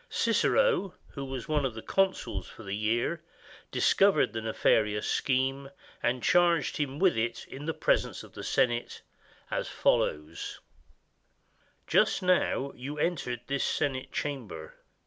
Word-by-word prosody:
Cicero, 465 - +2
who 140 - -6
was 130 -2 -5
one 150 -2 +1
of 130 -4 -2
the 110 - -7
consuls 195 -1 0
for 110 - -12
the 100 -1 -4
year, 115 +10 0 0.5
discovered 195 0 +3
the 115 - -2
nefari 110 -1 +2
ous 105 - -3
scheme 135 +1 0 0.3
and 120 +1 0
charged 170 -5 +3
him 140 -2 -2
with 185 +2 +3
it 115 +1 -2
in 140 +2 -9
the 160 - 0
presence - - +1
of - - -14
the - - -8
Senate, 120 -1 0 0.5
as - - -1
follows: 75 +2 0 0.6
— - - -43 0.3
"Just 195 - +3
now 180 -6 +2
you 140 +4 -6
entered 140 -8 -1
this 140 0 -1
Senate 130 -2 -1
Chamber. 110 - -5
135 Hz, 145 wpm, -29 LUFS, 115-160 Hz, 0.6 s, discovered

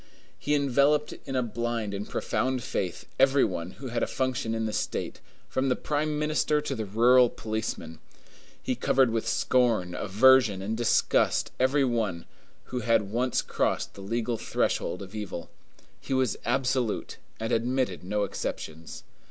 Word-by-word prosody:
He 150 - +1
enveloped 140 +2 +2
in 135 - -3
a 130 - +2
blind 115 -2 -2
and 100 +1 -5
profound 130 -1 -1
faith 95 -9 -3
every 135 +1 +5
one 90 -1 -4
who 130 -1 -6
had 115 0 -2
a - - +1
function 125 -3 -1
in 110 0 -1
the 110 - -3
state, - - -3 0.3
from 130 +1 0
the 125 - +2
prime 150 0 -1
minister 150 0 +1
to 150 -2 -3
the 110 -5 -4
rural 120 +4 +5
policeman. 110 -9 -4 0.6
He - - 0
covered 130 -3 +2
with 115 -1 -1
scorn, 115 -8 +2
aversion, 110 +2 +4
and 110 +3 -2
disgust 120 0 +2
every 135 +2 +3
one 110 -9 -1 0.4
who 125 - -4
had 115 -3 +1
once 125 +2 +1
crossed - - -1
the 100 - -11
legal 115 +3 -2
threshold 90 - -1
of 95 +1 -12
evil. 105 -5 -6 0.5
He 135 - -3
was 130 -5 +1
absolute, 125 -2 0 0.2
and 115 +2 -3
admitted 120 -5 0
no 105 +3 -1
exceptions. 80 -4 -5
120 Hz, 155 wpm, -27 LUFS, 105-130 Hz, 0.6 s, every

